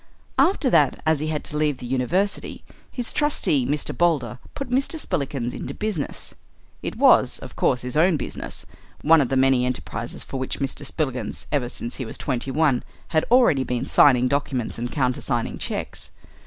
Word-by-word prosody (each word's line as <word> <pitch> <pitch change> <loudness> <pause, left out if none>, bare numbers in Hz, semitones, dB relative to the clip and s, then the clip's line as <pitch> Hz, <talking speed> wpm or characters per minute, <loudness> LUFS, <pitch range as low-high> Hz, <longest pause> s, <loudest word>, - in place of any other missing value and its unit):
After 355 -7 +3
that, 150 -5 +4
as 160 -2 +3
he 155 - -2
had 155 -1 -2
to 150 - -3
leave 150 -3 +1
the 125 - -8
university, 135 - -1 0.3
his 245 -2 -2
trustee, 155 - +2
Mr. 145 +1 -1
Boulder, 140 -8 +1 0.2
put 275 -3 -5
Mr. 275 +5 +1
Spillikins 135 - -2
into 135 - -6
business. 210 -9 -3 0.5
It - - -4
was, - - +5
of - - -10
course, 125 - +1
his 125 0 -4
own 165 +2 +4
business, 130 - -5 0.4
one 160 0 +6
of 130 - 0
the 135 - +1
many 130 -1 +4
enterprises 120 -2 -4
for 135 - -6
which 130 - -3
Mr. 135 +1 -3
Spillikins, 130 -9 -3
ever 130 -5 0
since 120 -1 -5
he 130 - -4
was 110 - -5
twenty 130 -1 -2
one, 135 -3 +2 0.3
had 155 -1 +2
already 235 - +5
been 125 -2 -2
signing 130 -3 +5
documents 135 -4 -1
and 120 +1 -3
countersigning 125 -3 -1
cheques. - - -4
140 Hz, 175 wpm, -23 LUFS, 125-160 Hz, 0.5 s, one